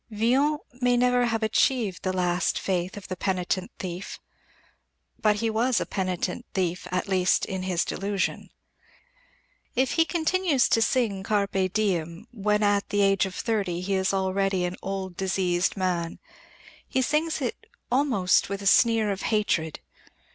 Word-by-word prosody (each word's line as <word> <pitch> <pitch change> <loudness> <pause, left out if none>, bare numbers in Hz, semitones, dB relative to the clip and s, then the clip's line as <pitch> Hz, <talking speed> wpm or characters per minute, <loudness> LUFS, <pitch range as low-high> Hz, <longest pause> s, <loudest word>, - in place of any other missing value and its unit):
Villon 255 +8 +2 0.2
may 245 0 +3
never 250 0 +3
have 225 -1 -1
achieved 220 -3 +1
the 185 - -1
last 180 -1 0
faith 185 0 -2
of 200 - -9
the 185 - -4
penitent 185 0 -1
thief. 180 +1 -6 1.0
But 210 -1 +4
he 225 +2 -1
was 235 +2 +2
a - - -2
penitent 185 -2 -3
thief 180 -2 -1
at 185 +3 -2
least 185 -2 +2
in 190 -1 -4
his 185 -2 0
disillusion. 195 0 -2 1.3
If 260 0 +2
he 330 - +3
continues 335 -4 +1
to 225 - +3
sing 225 -5 +1
Carpe 195 -2 0
diem 180 -3 -1
when 210 -2 0
at 205 -1 +2
the 205 - +1
age 195 -1 +3
of 185 - -9
thirty 195 -7 -1
he 195 +2 -2
is 190 0 +1
already 190 -1 0
an 180 +1 -3
old, 190 -2 -4
diseased 185 -1 0
man, 175 -3 -1 0.7
he 260 - 0
sings 310 +5 0
it 250 -5 -4 0.2
almost 245 -12 +2
with 200 0 -4
a - - -7
sneer 225 0 +4
of 195 - -4
hatred. 175 -8 0
195 Hz, 155 wpm, -26 LUFS, 185-225 Hz, 1.3 s, But